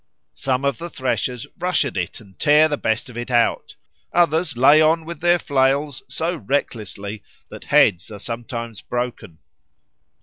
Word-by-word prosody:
Some 130 Hz, 0 st, -1 dB
of 140 Hz, -4 st, 0 dB
the 170 Hz, -, -6 dB
threshers 125 Hz, -4 st, -2 dB
rush 180 Hz, -3 st, +1 dB
at 130 Hz, -, -5 dB
it 90 Hz, -3 st, -3 dB
and 100 Hz, -5 st, -19 dB
tear 150 Hz, +1 st, +5 dB
the 150 Hz, -, -1 dB
best 110 Hz, -5 st, -1 dB
of 125 Hz, -, -12 dB
it 120 Hz, +1 st, -5 dB
out; 120 Hz, -2 st, +1 dB, 0.4 s
others 165 Hz, -4 st, +2 dB
lay 145 Hz, +5 st, +6 dB
on 160 Hz, +1 st, +3 dB
with 170 Hz, -2 st, -7 dB
their 175 Hz, +1 st, +4 dB
flails 140 Hz, -1 st, 0 dB
so 165 Hz, +6 st, -2 dB
recklessly 105 Hz, -7 st, -3 dB, 0.3 s
that -, -, -11 dB
heads 95 Hz, +5 st, +3 dB
are 105 Hz, -, -8 dB
sometimes 115 Hz, 0 st, -6 dB
broken. 120 Hz, -8 st, -5 dB
130 Hz, 160 wpm, -21 LUFS, 115-155 Hz, 0.4 s, lay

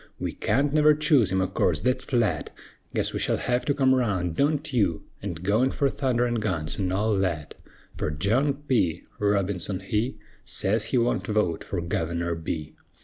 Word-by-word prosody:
We -, -, -2 dB
can't 140 Hz, +1 st, 0 dB
never 150 Hz, 0 st, +5 dB
choose 145 Hz, -, +3 dB
him 95 Hz, 0 st, +2 dB
o' 95 Hz, -, +1 dB
course, -, -, +1 dB
thet's 125 Hz, 0 st, +1 dB
flat; 120 Hz, -5 st, 0 dB, 0.5 s
Guess -, -, 0 dB
we -, -, -2 dB
shell -, -, +1 dB
hev 125 Hz, 0 st, -1 dB
to 145 Hz, -, +2 dB
come 130 Hz, -2 st, +4 dB
round, 95 Hz, -10 st, 0 dB
(don't 145 Hz, -, 0 dB
you?) 95 Hz, -9 st, +1 dB, 0.2 s
An' 100 Hz, -2 st, -3 dB
go 100 Hz, +7 st, +1 dB
in 130 Hz, -, +3 dB
fer 140 Hz, +1 st, +1 dB
thunder 125 Hz, -3 st, 0 dB
an' 120 Hz, -1 st, 0 dB
guns, 85 Hz, -7 st, -2 dB
an' 95 Hz, -2 st, 0 dB
all 105 Hz, +3 st, +1 dB
that; 85 Hz, -6 st, -2 dB, 0.4 s
Fer -, -, -1 dB
John 110 Hz, -, +1 dB
P. 90 Hz, -, +1 dB, 0.2 s
Robinson 100 Hz, -2 st, 0 dB
he 105 Hz, +6 st, -2 dB, 0.3 s
Sez 105 Hz, +3 st, 0 dB
he 125 Hz, -, 0 dB
wunt 120 Hz, 0 st, +1 dB
vote 105 Hz, -6 st, 0 dB
fer -, -, -3 dB
Guvener 85 Hz, 0 st, -2 dB
B. 80 Hz, -2 st, -4 dB
105 Hz, 185 wpm, -26 LUFS, 90-130 Hz, 0.5 s, never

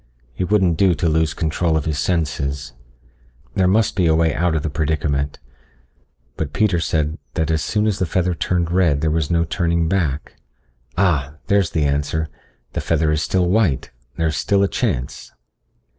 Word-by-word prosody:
It 90 Hz, +4 st, -2 dB
wouldn't 95 Hz, -6 st, +3 dB
do 95 Hz, -3 st, +4 dB
to 80 Hz, +3 st, 0 dB
lose 80 Hz, 0 st, +1 dB
control 80 Hz, 0 st, 0 dB
of 75 Hz, -, -2 dB
his 75 Hz, -2 st, -1 dB
senses. 70 Hz, -4 st, -1 dB, 0.8 s
There 95 Hz, +5 st, +2 dB
must 105 Hz, +3 st, +2 dB
be 90 Hz, -3 st, +2 dB
a 80 Hz, -, +4 dB
way 80 Hz, -1 st, +2 dB
out 85 Hz, 0 st, +1 dB
of 75 Hz, -, -1 dB
the 80 Hz, -, -1 dB
predicament. 75 Hz, -2 st, -1 dB, 1.0 s
But 75 Hz, -3 st, -3 dB
Peter 100 Hz, -3 st, +2 dB
said 80 Hz, -1 st, -1 dB, 0.2 s
that 80 Hz, -1 st, 0 dB
as 80 Hz, -1 st, +1 dB
soon 105 Hz, +4 st, 0 dB
as 105 Hz, -3 st, 0 dB
the 95 Hz, -, 0 dB
feather 90 Hz, +1 st, 0 dB
turned 85 Hz, 0 st, -1 dB
red 85 Hz, -6 st, +2 dB
there 80 Hz, -1 st, +1 dB
was 80 Hz, -1 st, 0 dB
no 85 Hz, -1 st, +2 dB
turning 85 Hz, 0 st, 0 dB
back. 80 Hz, -7 st, -1 dB, 0.6 s
Ah 75 Hz, -7 st, +1 dB
there's 100 Hz, -4 st, +2 dB
the 80 Hz, -3 st, 0 dB
answer. 75 Hz, +2 st, -1 dB, 0.4 s
The -, -, -2 dB
feather 80 Hz, -1 st, +1 dB
is 75 Hz, -1 st, 0 dB
still 90 Hz, +2 st, +1 dB
white... 95 Hz, -7 st, +1 dB, 0.3 s
there's 80 Hz, -2 st, 0 dB
still 100 Hz, -1 st, +2 dB
a -, -, +3 dB
chance. 85 Hz, -, -3 dB
80 Hz, 175 wpm, -20 LUFS, 75-90 Hz, 1.0 s, do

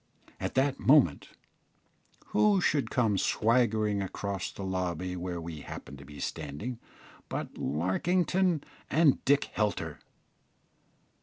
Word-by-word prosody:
At -, -, -3 dB
that 135 Hz, +1 st, +2 dB
moment 130 Hz, -, +4 dB, 1.0 s
who 210 Hz, -2 st, +4 dB
should 150 Hz, -5 st, +1 dB
come 110 Hz, -6 st, +2 dB
swaggering 110 Hz, -3 st, +2 dB
across 95 Hz, -1 st, -3 dB
the 100 Hz, -, -7 dB
lobby 90 Hz, -1 st, -2 dB
where 90 Hz, -1 st, -4 dB
we 80 Hz, -2 st, -6 dB
happened 70 Hz, 0 st, -9 dB
to 70 Hz, -, -11 dB
be 75 Hz, -1 st, -11 dB
standing 80 Hz, -, -5 dB, 0.5 s
but -, -, -4 dB
Larkington 170 Hz, -, +1 dB, 0.3 s
and 155 Hz, -4 st, +4 dB
Dick 140 Hz, +1 st, +4 dB
Helter! 105 Hz, -2 st, -1 dB
105 Hz, 110 wpm, -30 LUFS, 90-140 Hz, 1.0 s, moment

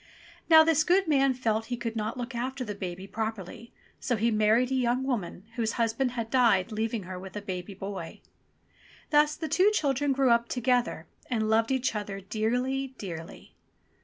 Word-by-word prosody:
Now 320 Hz, -1 st, +9 dB
this 315 Hz, -1 st, +3 dB
good 370 Hz, +2 st, +3 dB
man 275 Hz, -3 st, +3 dB
felt 225 Hz, -3 st, 0 dB
he 245 Hz, -, -3 dB
could 230 Hz, -1 st, -4 dB
not 220 Hz, +2 st, -3 dB
look 245 Hz, +1 st, -5 dB
after 255 Hz, +2 st, -3 dB
the 210 Hz, -, -4 dB
baby 185 Hz, -2 st, -6 dB
properly, 220 Hz, +1 st, -5 dB, 0.3 s
so 245 Hz, -, 0 dB
he 230 Hz, +2 st, +1 dB
married 220 Hz, +4 st, +3 dB
a -, -, +1 dB
young 250 Hz, 0 st, +1 dB
woman 220 Hz, -9 st, -3 dB
whose 225 Hz, -1 st, 0 dB
husband 235 Hz, +2 st, 0 dB
had 230 Hz, -2 st, -4 dB
died 230 Hz, -6 st, +3 dB
leaving 220 Hz, 0 st, -2 dB
her 180 Hz, 0 st, -7 dB
with 190 Hz, +1 st, -10 dB
a -, -, -2 dB
baby 185 Hz, 0 st, -5 dB
boy. 195 Hz, 0 st, -7 dB, 0.9 s
Thus 300 Hz, 0 st, +4 dB
the 320 Hz, -, -4 dB
two 375 Hz, +5 st, +4 dB
children 285 Hz, -8 st, +1 dB
grew 265 Hz, -2 st, +3 dB
up 235 Hz, 0 st, +2 dB
together, 245 Hz, -8 st, 0 dB, 0.2 s
and 220 Hz, -3 st, 0 dB
loved 225 Hz, +1 st, +3 dB
each 260 Hz, -2 st, 0 dB
other 205 Hz, -2 st, -4 dB
dearly, 250 Hz, +7 st, -2 dB
dearly. 165 Hz, -4 st, -8 dB
235 Hz, 180 wpm, -28 LUFS, 210-265 Hz, 0.9 s, Now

